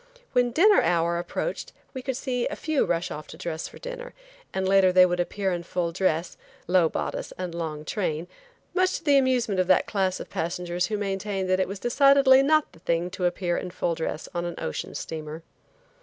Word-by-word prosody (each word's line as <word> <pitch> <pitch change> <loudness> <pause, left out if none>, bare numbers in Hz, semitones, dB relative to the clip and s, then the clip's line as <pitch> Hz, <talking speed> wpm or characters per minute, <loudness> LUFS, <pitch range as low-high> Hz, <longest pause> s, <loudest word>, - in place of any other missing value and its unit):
When 245 -1 +3
dinner 390 - +5
hour 170 0 +1
approached 175 - -4 0.2
we 260 -2 -6
would 260 -2 -1
see 250 -3 -1
a - - -4
few 310 -3 0
rush 170 0 -1
off 150 - -7
to 160 - -11
dress 165 -2 -4
for - - -13
dinner - - -8 0.4
and 190 0 -1
later 190 -1 +5
they 185 0 +7
would 180 0 -1
appear 190 +2 -1
in 175 -1 -2
full 170 0 -2
dress, 170 -2 -1 0.3
low 175 -2 +3
bodice - - -4
and 180 -2 -4
long 155 -3 -4
train, 170 -4 -2 0.5
much 370 0 +2
to - - -13
the 285 -3 +5
amusement 245 -7 +1
of 185 - +2
that 185 - +4
class 190 -3 0
of - - -7
passengers 175 +1 -2
who 215 - -2
maintained 195 -1 -2
that 185 - +3
it 190 - +1
was 195 +2 -5
decidedly 270 +3 +5
not 310 +2 +3
the - - -17
thing 170 +1 -1
to 180 - -2
appear 175 0 0
in 180 - -4
full 175 -1 -1
dress 160 -1 -4
on 175 -1 -2
an 175 -1 -4
ocean 80 - -4
steamer. 155 0 -6
185 Hz, 205 wpm, -26 LUFS, 170-245 Hz, 0.5 s, they